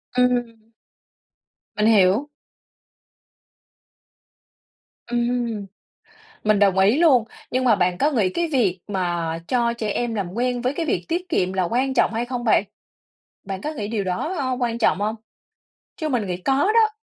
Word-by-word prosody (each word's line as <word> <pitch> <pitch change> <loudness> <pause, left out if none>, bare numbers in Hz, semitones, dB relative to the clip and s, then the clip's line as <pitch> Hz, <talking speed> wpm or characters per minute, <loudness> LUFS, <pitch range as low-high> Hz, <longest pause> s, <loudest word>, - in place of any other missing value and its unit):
Ừm. 240 -3 0 1.1
Mình 210 +1 +2
hiểu. 215 +5 +4 2.8
Ừm, 240 -3 -1 0.8
mình 210 -1 +3
đồng 195 -2 +3
ý 205 +9 +4
luôn. 270 -9 +5 0.3
Nhưng 255 +1 0
mà 230 -4 +5
bạn 180 -1 0
có 295 +2 +2
nghĩ 215 -9 +2
cái 340 - -1
việc 195 -9 +1
mà 175 -4 -2
cho 240 -2 +1
trẻ 225 -2 -4
em 235 0 -2
làm 195 -4 -2
quen 245 +1 -1
với 255 +2 0
cái 330 -2 -2
việc 175 - -1
tiết 360 +2 -2
kiệm 185 - 0
là 190 -1 0
quan 260 +7 0
trọng - - +3
hay 235 +2 -1
không 245 -1 -4
bạn? 215 -3 +3 0.8
Bạn 190 -1 -5
có 305 - -4
nghĩ 210 -8 -5
điều 215 -3 -2
đó, 185 - -2
ơ, 260 -2 -1
quan 235 -1 -1
trọng 225 - +2
hông? 215 +2 0 0.8
Chứ 310 -2 -3
mình 230 -7 -1
nghĩ 180 -1 -2
có 225 +9 0 0.2
đó. 445 -1 +5
230 Hz, 160 wpm, -22 LUFS, 195-255 Hz, 2.8 s, luôn